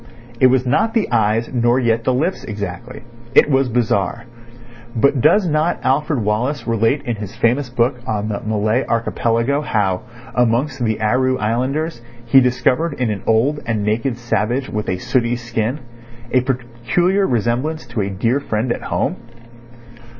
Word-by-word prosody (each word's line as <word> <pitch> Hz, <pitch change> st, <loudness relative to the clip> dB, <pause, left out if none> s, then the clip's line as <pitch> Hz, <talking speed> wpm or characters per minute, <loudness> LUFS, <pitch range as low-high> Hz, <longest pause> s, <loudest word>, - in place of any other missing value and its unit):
It 130 Hz, -, +7 dB
was 130 Hz, 0 st, +2 dB
not 220 Hz, -, +1 dB
the 220 Hz, -9 st, +1 dB
eyes 115 Hz, 0 st, +2 dB
nor 120 Hz, +1 st, +2 dB
yet 115 Hz, -2 st, +1 dB
the -, -, +3 dB
lips 165 Hz, +9 st, -1 dB
exactly. 105 Hz, +4 st, -6 dB, 0.3 s
It 150 Hz, -, +6 dB
was 135 Hz, -1 st, +2 dB
bizarre. 115 Hz, -2 st, 0 dB, 0.7 s
But 135 Hz, +2 st, +2 dB
does 205 Hz, -, +4 dB
not 155 Hz, +2 st, +1 dB
Alfred 135 Hz, -2 st, +1 dB
Wallace 120 Hz, +6 st, -1 dB
relate 115 Hz, +5 st, +1 dB
in 120 Hz, -5 st, -3 dB
his 105 Hz, +1 st, -7 dB
famous 120 Hz, +3 st, +1 dB
book 120 Hz, +1 st, 0 dB
on 105 Hz, -2 st, -1 dB
the 105 Hz, -2 st, -3 dB
Malay 110 Hz, +3 st, 0 dB
Archipelago 115 Hz, +3 st, 0 dB
how, 100 Hz, -9 st, 0 dB, 0.3 s
amongst 125 Hz, +3 st, +1 dB
the 110 Hz, -1 st, 0 dB
Aru 130 Hz, +4 st, +1 dB
Islanders, 130 Hz, +7 st, -1 dB, 0.2 s
he 135 Hz, +3 st, +6 dB
discovered 125 Hz, +5 st, +1 dB
in 125 Hz, -5 st, -1 dB
an 100 Hz, -, -4 dB
old 125 Hz, +7 st, +2 dB
and 110 Hz, -3 st, -1 dB
naked 115 Hz, +4 st, -1 dB
savage 120 Hz, +2 st, -1 dB
with 105 Hz, 0 st, -3 dB
a 90 Hz, -, -1 dB
sooty 120 Hz, +4 st, 0 dB
skin 120 Hz, +2 st, -3 dB, 0.5 s
a 130 Hz, -, +4 dB
peculiar 130 Hz, +10 st, 0 dB
resemblance 125 Hz, +7 st, -1 dB
to 120 Hz, -2 st, -3 dB
a 100 Hz, -, -2 dB
dear 115 Hz, +8 st, 0 dB
friend 120 Hz, -3 st, -2 dB
at -, -, -2 dB
home? -, -, -1 dB
120 Hz, 155 wpm, -19 LUFS, 110-135 Hz, 0.7 s, It